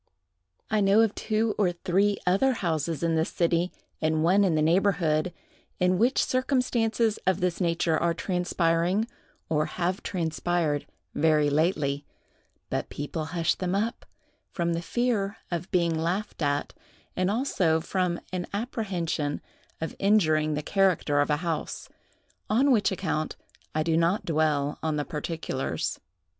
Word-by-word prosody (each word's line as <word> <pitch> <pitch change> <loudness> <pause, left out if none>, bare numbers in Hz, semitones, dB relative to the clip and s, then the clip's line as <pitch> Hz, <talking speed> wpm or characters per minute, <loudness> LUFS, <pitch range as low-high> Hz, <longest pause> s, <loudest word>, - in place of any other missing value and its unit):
I 215 -1 +3
know 200 +2 +5
of 225 -2 +2
two 220 0 0
or 190 -4 +3
three 190 +3 +1
other 200 +9 +3
houses 165 - -2
in 165 -1 +2
this 160 0 +1
city, 170 +1 +1 0.3
and 155 0 +1
one 190 +5 +4
in 180 -5 +2
the 155 - +2
neighborhood, 170 -2 +2 0.5
in 180 0 +2
which 245 +4 +3
circumstances 240 -4 +1
of 190 -2 +3
this 180 0 -1
nature 165 -2 +1
are 170 0 +1
transpiring, 180 +2 +1 0.4
or 155 -1 +1
have 180 +1 -2
transpired 165 -3 -1 0.3
very 150 -1 +3
lately; 150 -2 +1 0.7
but - - -2
people 150 +2 -4
hush 165 +1 0
them 185 0 -2
up, 220 +4 -2 0.4
from 170 -1 -1
the 165 - -2
fear 220 -1 -1
of 175 0 -3
being 170 -2 +2
laughed 170 +5 -2
at, 145 -1 0 0.4
and 185 0 +1
also 195 - +1
from 175 +1 -1
an 180 -1 -2
apprehension 185 - -2 0.4
of 160 - -4
injuring 155 -7 +3
the 150 - -3
character 185 -7 +2
of 145 - 0
a 150 - +2
house; 165 -3 -3 0.6
on 260 +6 +4
which 220 -5 +3
account, 155 -4 -2 0.4
I 155 - +2
do 165 0 +1
not 170 +5 +2
dwell 150 -3 +1
on 160 -1 -1
the 145 -1 -1
particulars. 150 -3 -3
170 Hz, 145 wpm, -27 LUFS, 160-200 Hz, 0.7 s, know